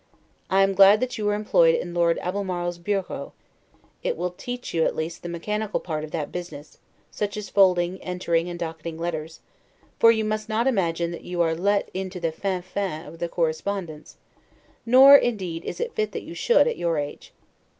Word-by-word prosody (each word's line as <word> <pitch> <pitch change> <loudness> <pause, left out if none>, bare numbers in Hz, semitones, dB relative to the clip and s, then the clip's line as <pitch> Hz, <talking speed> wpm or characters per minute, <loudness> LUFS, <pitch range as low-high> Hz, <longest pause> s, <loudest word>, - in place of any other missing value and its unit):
I 195 +1 +4
am, 195 0 +2
glad 195 +2 +7
that 255 -1 -3
you 210 -1 0
are 205 - +1
employed 485 - +4
in 175 - -4
Lord 170 -1 +2
Albemarle's 180 -2 -3
bureau; 195 +2 -3 0.7
it - - -2
will 180 - -2
teach 245 +7 -7
you, 165 -1 +2
at - - 0
least, 160 +2 -4
the 175 - -6
mechanical 210 +5 -2
part 155 -3 -4
of 155 - -6
that 150 -1 -4
business, 175 -4 -8 0.3
such 205 0 -3
as 210 -2 -6
folding, 185 -2 +3
entering, 180 -2 -1
and 175 - -6
docketing 165 -1 -5
letters; 160 -1 -5 0.6
for 230 - +7
you 220 -1 0
must 215 +1 -3
not 220 +2 +1
imagine 170 -8 0
that 170 - -8
you 175 -1 -1
are 165 -1 +1
let 200 +5 0
into 185 0 -5
the 165 -2 -1
'fin 185 +2 -3
fin' 185 -3 -4
of 165 - -12
the 170 0 -2
correspondence, 165 -1 -3 0.7
nor 265 +4 +9
indeed 190 -11 +1
is - - -5
it 475 -1 -3
fit 435 -1 -2
that - - -5
you - - -9
should, - - +3
at, 480 - -1
your 170 -2 0
age. 145 0 -5
180 Hz, 190 wpm, -24 LUFS, 170-210 Hz, 0.7 s, nor